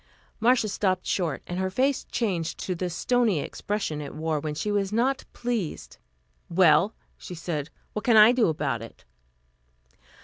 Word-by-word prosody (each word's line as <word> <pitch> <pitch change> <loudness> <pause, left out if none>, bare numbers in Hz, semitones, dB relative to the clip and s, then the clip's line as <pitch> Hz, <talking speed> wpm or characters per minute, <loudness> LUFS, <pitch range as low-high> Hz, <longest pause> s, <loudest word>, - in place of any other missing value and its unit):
Marcia 240 0 +3
stopped 190 -2 0
short 165 -7 -1
and 175 +1 -4
her 190 0 0
face 260 +7 0
changed 185 -9 -2
to 185 - -3
the 180 +1 -3
stony 220 +1 +1
expression 195 -2 -3
it 145 - -7
wore 155 0 -1
when 150 0 -4
she 210 +7 -2
was 200 -1 0
not 255 +5 +1
pleased. 235 -9 -4 0.5
"Well," 175 +3 +4 0.2
she 180 - -8
said, 155 -3 -4 0.2
"What 210 - -4
can 235 -3 +5
I 215 +2 +9
do 245 -2 +3
about 145 -8 -1
it?" 115 - -12
190 Hz, 160 wpm, -26 LUFS, 160-225 Hz, 0.5 s, I